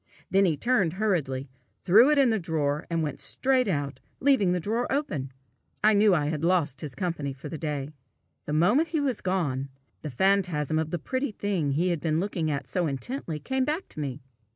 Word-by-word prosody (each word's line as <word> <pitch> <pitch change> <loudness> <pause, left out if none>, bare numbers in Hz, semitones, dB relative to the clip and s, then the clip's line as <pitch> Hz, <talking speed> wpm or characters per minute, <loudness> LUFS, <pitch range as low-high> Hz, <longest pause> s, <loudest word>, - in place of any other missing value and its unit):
Then 195 +1 +4
he 160 -5 +1
turned 205 - +2
hurriedly, 160 -10 -1 0.4
threw 215 +9 +6
it 300 - +3
in 270 -4 +5
the 220 - +1
drawer, 150 -4 -1
and 165 -1 0
went 145 -3 -4
straight 260 -2 +1
out, 145 -7 -2 0.2
leaving 260 -10 +3
the 180 - +1
drawer 225 +7 -1
open. 155 - -2 0.5
I 215 +1 +6
knew 205 -2 +5
I 150 -3 +1
had 150 0 -2
lost 165 -6 +1
his 150 -5 -6
company 165 -7 -3
for 140 +3 -9
the 160 - -5
day. 150 -2 -3 0.5
The 150 - -3
moment 210 - +3
he 315 -1 -1
was 275 -4 -1
gone, 145 -8 -1 0.3
the 155 - -5
phantasm 160 -1 +1
of 160 -1 -2
the 175 - -2
pretty 260 - -2
thing 190 -9 -1
he 175 +6 +1
had 170 -3 0
been 160 -1 +1
looking 175 -4 -1
at 140 -2 -3
so 180 -3 0
intently, 160 - -4
came 265 - -1
back 310 +7 -2
to - - -9
me. 140 -2 -4
170 Hz, 200 wpm, -27 LUFS, 150-210 Hz, 0.5 s, threw